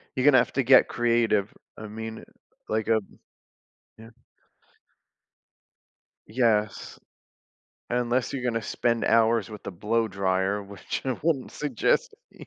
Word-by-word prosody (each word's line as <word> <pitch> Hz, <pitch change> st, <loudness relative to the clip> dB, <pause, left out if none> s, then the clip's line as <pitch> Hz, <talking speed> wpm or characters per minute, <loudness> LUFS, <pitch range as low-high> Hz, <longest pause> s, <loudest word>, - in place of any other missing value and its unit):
You're 130 Hz, -, 0 dB
gonna 145 Hz, -3 st, +7 dB
have -, -, -1 dB
to 135 Hz, -, +1 dB
get 130 Hz, +1 st, +6 dB
creative, 115 Hz, -4 st, +1 dB, 0.3 s
I 110 Hz, -, -8 dB
mean, 110 Hz, +1 st, -7 dB, 0.5 s
like, 110 Hz, 0 st, -1 dB
um 110 Hz, -3 st, -1 dB, 0.8 s
yeah. 110 Hz, +1 st, -13 dB, 2.2 s
Yes. 110 Hz, -2 st, 0 dB, 0.9 s
Unless 125 Hz, +1 st, 0 dB
you're 135 Hz, -2 st, -4 dB
gonna 115 Hz, -2 st, -1 dB
spend 115 Hz, +2 st, -1 dB
hours 115 Hz, -1 st, +3 dB
with 105 Hz, -1 st, -9 dB
the -, -, -5 dB
blow 110 Hz, +5 st, -1 dB
dryer, 95 Hz, +1 st, 0 dB
which 100 Hz, 0 st, -6 dB
I 130 Hz, -2 st, -2 dB
wouldn't 150 Hz, -5 st, 0 dB
suggest 150 Hz, -, 0 dB, 0.2 s
ei -, -, -13 dB
115 Hz, 125 wpm, -26 LUFS, 105-125 Hz, 2.2 s, gonna